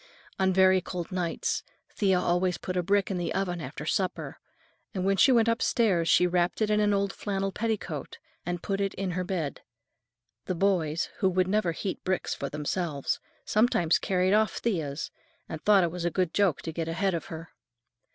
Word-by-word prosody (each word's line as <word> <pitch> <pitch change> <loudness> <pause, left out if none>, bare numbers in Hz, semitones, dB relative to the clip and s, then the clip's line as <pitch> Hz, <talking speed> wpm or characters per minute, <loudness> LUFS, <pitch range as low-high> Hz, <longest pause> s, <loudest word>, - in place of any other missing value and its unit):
On 190 0 +3
very 190 0 +5
cold 180 0 -5
nights 180 -3 -1 0.3
Thea 190 -3 +2
always 180 0 +1
put 185 - -5
a 180 - +2
brick 200 +2 +1
in 190 - -1
the 175 - -2
oven 180 -3 -1
after 150 +1 -6
supper, 185 +3 -2 0.6
and 185 -1 -1
when 195 0 +3
she 265 +7 +5
went 230 -2 +4
upstairs 225 -6 +2
she 180 - +5
wrapped 175 0 +1
it 215 -1 +1
in 210 - +3
an 210 0 +3
old 200 -1 +1
flannel 195 -1 -2
petticoat 195 - -3 0.3
and 175 0 -4
put 195 0 -1
it 195 -1 -1
in 190 -1 -2
her 180 +1 -2
bed. 175 -6 -3 0.8
The 185 - -2
boys, 170 -4 +1
who 190 - +2
would 185 0 +1
never 200 -3 +1
heat 190 +4 -4
bricks 185 0 -1
for 140 - -4
themselves, 150 -1 -2 0.3
sometimes 210 -7 +3
carried 185 0 +1
off 215 0 +2
Thea's, 165 -8 -2 0.4
and 155 - -6
thought 205 -3 +5
it 175 0 -2
a 175 - +2
good 180 -1 -1
joke 195 -8 +2
to 160 - -5
get 165 0 -3
ahead 185 +4 0
of 165 - -3
her. 165 +1 -8
185 Hz, 190 wpm, -28 LUFS, 170-195 Hz, 0.8 s, very